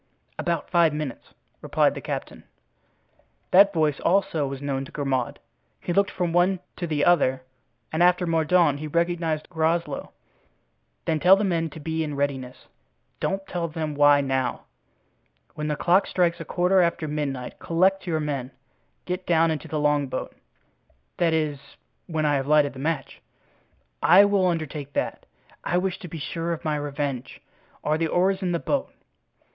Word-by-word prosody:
"About 170 -3 -1
five 170 -4 +3
minutes," 150 -4 -6 0.3
replied - - +2
the - - -7
captain. - - -6 1.1
That 200 +2 +7
voice 155 -5 +1
also 170 -5 +1
was 135 0 -5
known 135 -1 -2
to - - -13
Grimaud. 135 -4 -2 0.4
He 175 - -3
looked 200 +2 +3
from 175 -3 -2
one 180 +2 +3 0.2
to 175 - -3
the 150 -2 0
other 130 -7 +3 0.5
and 160 - 0
after 180 0 +4
Mordaunt 165 -2 +2
he 155 - -5
recognized 170 -1 -1
Groslow. 160 -2 -1 0.9
"Then 160 - 0
tell 180 +4 +7
the 200 - -1
men 165 -4 0
to 155 - -10
be 160 +1 -2
in 150 -2 -4
readiness—don't 140 +7 -5
tell 175 -3 -3
them 155 -1 -4
why 145 0 +5
now. 130 -2 -1 0.9
When 150 0 -4
the 150 - 0
clock 180 +5 +3
strikes 175 -1 +1
a 165 - -6
quarter 180 +3 +2
after 170 -2 0
midnight 140 -4 -4
collect 190 +3 +1
your 160 -2 0
men. 140 -4 -3 0.6
Get 180 +1 -4
down 165 -1 +3
into 155 - -4
the 155 - -2
longboat." 145 -3 0 0.8
"That 170 -2 +2
is, 150 -3 -1 0.5
when 160 -2 -1
I 145 -1 +3
have 135 0 -3
lighted 150 -1 +4
the 130 - -10
match?" 145 -1 -3 0.8
"I 190 +4 +7
will 200 -2 +2
undertake 155 -4 -3
that. - - -3 0.4
I 175 - 0
wish 185 0 -1
to 180 - -8
be 165 0 -7
sure 165 +3 -3
of 160 - -7
my 155 -1 0
revenge. 145 -3 -4 0.4
Are 155 +1 +1
the 165 - +1
oars 190 +4 +1
in 180 -2 -1
the 170 - +1
boat?" 275 +10 -2
160 Hz, 160 wpm, -25 LUFS, 145-175 Hz, 1.1 s, That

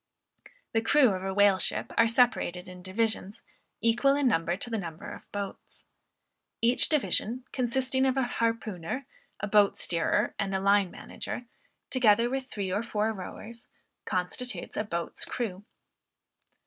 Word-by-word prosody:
The 225 - +2
crew 265 +2 +5
of 190 -2 -2
a 195 - -1
whale 200 -1 +5
ship - - -2
are 230 - +5
separated 225 -7 +2
in 180 0 -10
divisions, 205 +1 -1 0.4
equal 240 +5 +4
in 285 -2 +2
number 170 -5 +1
to 200 - -5
the 225 - 0
number 165 -4 -7
of - - -8
the - - -34
boats. 200 -1 -7 0.8
Each 235 +2 +3
division, 245 - +1
consisting 260 +1 +1
of 260 0 +1
a 265 - +3
harpooner, 230 -1 -2 0.4
a - - 0
boat 205 -1 +4
steerer, 165 -1 +1
and 195 -1 0
a - - +1
line 200 -1 +4
manager, 245 - -6 0.5
together 235 -2 +4
with 265 -1 -2
three 200 -6 -3
or 205 - +1
four 220 -1 -1
rowers, 220 +4 -9 0.4
constitutes 185 +8 -3
a - - 0
"boats 170 -5 -3
crew." 205 -5 -4
215 Hz, 150 wpm, -29 LUFS, 190-245 Hz, 0.8 s, crew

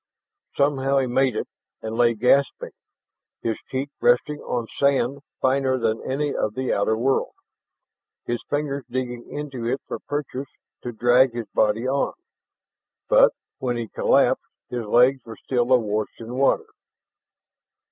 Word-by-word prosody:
Somehow 140 -1 +2
he 135 - +3
made 130 -1 +1
it - - -2 0.4
and 110 0 -4
lay 120 0 +3
gasping, 130 +5 +2 0.7
his 115 -1 -1
cheek 135 +2 -3
resting 145 +5 +3
on 120 -2 -3
sand 140 +2 +1 0.2
finer 130 0 +2
than 115 -2 0
any 145 +2 -1
of 105 - -1
the 130 0 -1
outer 110 +2 +1
world, 130 +4 0 0.9
his 120 0 -2
fingers 145 -1 -1
digging 125 -1 -4
into 135 -5 -5
it 130 +3 0
for - - -4
purchase 140 -2 -4 0.3
to 120 - -5
drag 120 +2 +4
his 120 -2 -3
body 110 +3 +1
on. 140 +1 0 1.0
But - - +6 0.3
when 125 -2 -1
he 115 -2 -4
collapsed, - - +2 0.2
his 120 -3 -3
legs 125 +4 +4
were 115 -1 -10
still 125 -1 -1
awash 110 -4 +1
in 115 +1 -7
water. 135 - +2
130 Hz, 140 wpm, -23 LUFS, 120-135 Hz, 1.0 s, But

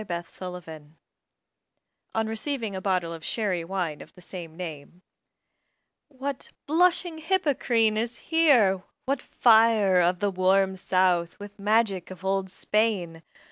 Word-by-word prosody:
DON 175 -4 -4
QUIXOTE 175 -4 -9 1.3
On 225 0 +1
receiving 225 -1 -3
a 190 - -4
bottle 185 -4 0
of 165 -1 -9
Sherry 195 -7 -1
Wine 170 -4 -3
of - - -14
the 180 - -15
same 165 -2 -9
name 170 0 -8 1.0
What 275 -1 -6 0.2
"blushing 340 +1 +2
Hippocrene" 270 - +1
is 230 +2 -2
here! 255 - +3 0.2
what 270 0 -1
fire 220 -5 +4
Of 175 +1 +2
the 200 +2 0
"warm 190 +1 +2
South" 185 -2 +1
with 205 0 -11
magic 205 -3 +1
of 185 0 -10
old 195 0 0
Spain! 190 -5 -1
195 Hz, 130 wpm, -26 LUFS, 180-230 Hz, 1.3 s, fire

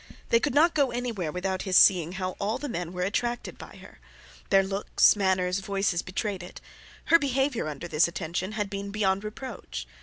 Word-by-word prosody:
They 230 - +5
could 240 - -1
not 330 +4 +5
go 280 -3 +2
anywhere 235 -9 -3
without 185 +2 -2
his 185 -2 +2
seeing 175 -3 +5
how 185 -1 -3
all 210 +4 -1
the 290 +2 -5
men 175 - -4
were 180 0 -3
attracted 240 +5 -2
by - - -11
her; - - -15 0.5
their 195 -1 +5
looks, 195 +2 +3
manners, 190 -2 +1
voices, 195 -2 -1
betrayed 195 0 -4
it; 180 - -10 0.5
her 335 - +9
behaviour 270 - 0
under 155 +3 -6
this 155 0 +3
attention 170 +4 -4
had 210 -1 -2
been 200 0 -5
beyond 200 -1 0
reproach. 210 - -7
195 Hz, 185 wpm, -27 LUFS, 180-230 Hz, 0.5 s, her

